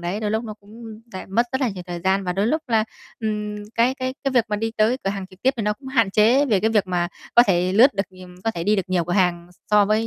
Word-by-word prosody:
đấy, 175 Hz, +5 st, -3 dB
đôi 210 Hz, -, -1 dB
lúc 220 Hz, +2 st, -1 dB
nó 215 Hz, -2 st, -6 dB
cũng 220 Hz, +1 st, -12 dB
lại 190 Hz, -, -7 dB
mất 230 Hz, +5 st, +1 dB
rất 260 Hz, -, -1 dB
là 260 Hz, -, +2 dB
nhiều 190 Hz, -4 st, -6 dB
thời 175 Hz, -1 st, -5 dB
gian. 190 Hz, +2 st, +1 dB
Và 180 Hz, -, -1 dB
đôi 195 Hz, +3 st, 0 dB
lúc 310 Hz, +6 st, 0 dB
là, 220 Hz, -2 st, +2 dB, 0.4 s
ừm, 210 Hz, -1 st, -3 dB, 0.2 s
cái 240 Hz, +3 st, +2 dB
cái 260 Hz, 0 st, -4 dB
cái 275 Hz, -, +1 dB
việc 245 Hz, -3 st, +3 dB
mà 210 Hz, -, -1 dB
đi 225 Hz, +1 st, -2 dB
tới 220 Hz, +4 st, +3 dB
cửa 195 Hz, -, +1 dB
hàng 195 Hz, -1 st, -5 dB
trực 185 Hz, 0 st, -20 dB
tiếp 260 Hz, -, +4 dB
thì 225 Hz, -, -2 dB
nó 210 Hz, 0 st, +1 dB
cũng 265 Hz, +5 st, -11 dB
hạn 230 Hz, -7 st, +2 dB
chế 235 Hz, +8 st, +4 dB
về 210 Hz, -7 st, +2 dB
cái 220 Hz, +3 st, +1 dB
việc 210 Hz, -4 st, +2 dB
mà 175 Hz, -1 st, -1 dB, 0.3 s
có 240 Hz, -, +9 dB
thể 180 Hz, -1 st, +2 dB
lướt 245 Hz, +7 st, +6 dB
được, 195 Hz, -, +1 dB
ừm 185 Hz, -1 st, -13 dB
có 225 Hz, -, +2 dB
thể 170 Hz, -6 st, -5 dB
đi 210 Hz, +2 st, +3 dB
được 195 Hz, -, +1 dB
nhiều 180 Hz, -2 st, +1 dB
cửa 175 Hz, -, -3 dB
hàng 175 Hz, -2 st, +1 dB
s 175 Hz, -, -27 dB
so 210 Hz, -1 st, +5 dB
với 215 Hz, +2 st, +1 dB
210 Hz, 310 wpm, -22 LUFS, 185-230 Hz, 0.4 s, có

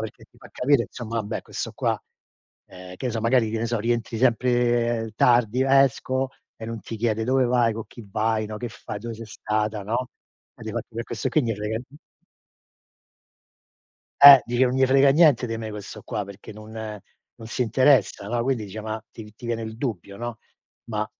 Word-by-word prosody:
perché 110 Hz, -1 st, -7 dB
ti -, -, -27 dB
fa -, -, -14 dB
capire, 130 Hz, -2 st, +2 dB
insomma, 115 Hz, -1 st, -7 dB
vabbè, 105 Hz, -, -4 dB
questo -, -, -5 dB
qua, -, -, -1 dB, 0.7 s
ehm, 90 Hz, -1 st, -11 dB
che 130 Hz, -, -4 dB
ne 125 Hz, -, -2 dB
so, 115 Hz, -, -2 dB
magari, 115 Hz, 0 st, +2 dB
che 115 Hz, -, -2 dB
ne 115 Hz, -, -1 dB
so, 115 Hz, 0 st, -1 dB
rientri 115 Hz, 0 st, -1 dB
sempre 120 Hz, -2 st, +1 dB
tardi. 120 Hz, +1 st, +3 dB
"Esco", 135 Hz, -1 st, +2 dB, 0.3 s
e 110 Hz, -, -9 dB
non 115 Hz, 0 st, -5 dB
ti 110 Hz, +3 st, -7 dB
chiede: 110 Hz, 0 st, 0 dB
"Dove 130 Hz, +2 st, +2 dB
vai, 120 Hz, -2 st, +2 dB
co' 115 Hz, 0 st, -5 dB
cchi 115 Hz, -3 st, -13 dB
vai". 110 Hz, +1 st, 0 dB
No? 105 Hz, 0 st, -6 dB
"Che 120 Hz, -, -4 dB
fai, 115 Hz, -3 st, -7 dB
dove 115 Hz, +1 st, -6 dB
sei 115 Hz, +1 st, -9 dB
stata". 105 Hz, 0 st, -2 dB
No? 120 Hz, +5 st, -2 dB, 0.5 s
Eh -, -, -12 dB
difatti -, -, -5 dB
per 115 Hz, -, -3 dB
questo 115 Hz, -4 st, -3 dB
qui 155 Hz, -, +3 dB
'n -, -, -3 dB
gli -, -, -2 dB
je -, -, 0 dB
frega 105 Hz, +2 st, -3 dB
n 125 Hz, +4 st, -13 dB, 2.2 s
Eh, 140 Hz, -1 st, +12 dB
dice: 120 Hz, +2 st, +2 dB
"Nun 125 Hz, 0 st, 0 dB
je 130 Hz, -, +5 dB
frega 135 Hz, +1 st, +5 dB
niente 145 Hz, -5 st, +5 dB
di 115 Hz, -1 st, -3 dB
me 110 Hz, -1 st, -5 dB
questo 105 Hz, -1 st, -8 dB
qua 105 Hz, -, -4 dB
perché 100 Hz, +1 st, -11 dB
non 110 Hz, +1 st, -12 dB, 0.7 s
non 115 Hz, -, -9 dB
si 120 Hz, -, -1 dB
interessa". 125 Hz, -3 st, +3 dB
No? 120 Hz, +1 st, 0 dB
Quindi 125 Hz, -3 st, -1 dB
dice 105 Hz, +2 st, -7 dB
ma 110 Hz, +1 st, -5 dB
ti 105 Hz, -2 st, -11 dB
ti 120 Hz, -, -15 dB
viene 115 Hz, -1 st, -2 dB
il 110 Hz, 0 st, -6 dB
dubbio, 105 Hz, -6 st, -4 dB
no? 120 Hz, 0 st, -5 dB, 0.5 s
"Ma 105 Hz, -1 st, -2 dB
115 Hz, 205 wpm, -24 LUFS, 110-125 Hz, 2.2 s, Eh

